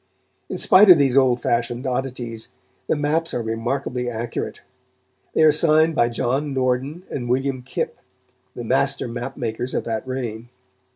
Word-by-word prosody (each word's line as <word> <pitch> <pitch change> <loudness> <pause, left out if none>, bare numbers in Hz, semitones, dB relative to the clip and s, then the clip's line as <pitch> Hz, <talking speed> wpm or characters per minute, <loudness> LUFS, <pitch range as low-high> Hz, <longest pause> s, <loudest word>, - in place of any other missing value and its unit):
In - - -4
spite 200 +2 +6
of 180 - +10
these 135 -3 +2
old 130 -3 +4
fashioned 120 +2 -1
oddities, 125 -3 -4 0.4
the - - +1
maps 155 +3 -1
are 120 - -2
remarkably 125 +2 -2
accurate. 115 0 -5 0.7
They - - +4
are 155 - +7
signed 155 +1 +4
by 120 -6 +2
John 135 +4 -1
Norden 130 +6 -1
and 120 -3 -4
William 130 +1 0
Kip, 125 - -4 0.6
the 120 - -6
master 135 +3 +1
map 120 +3 -6
makers 120 0 -3
of - - -1
that 115 +1 -4
reign. 120 -3 -5
130 Hz, 155 wpm, -22 LUFS, 120-140 Hz, 0.7 s, of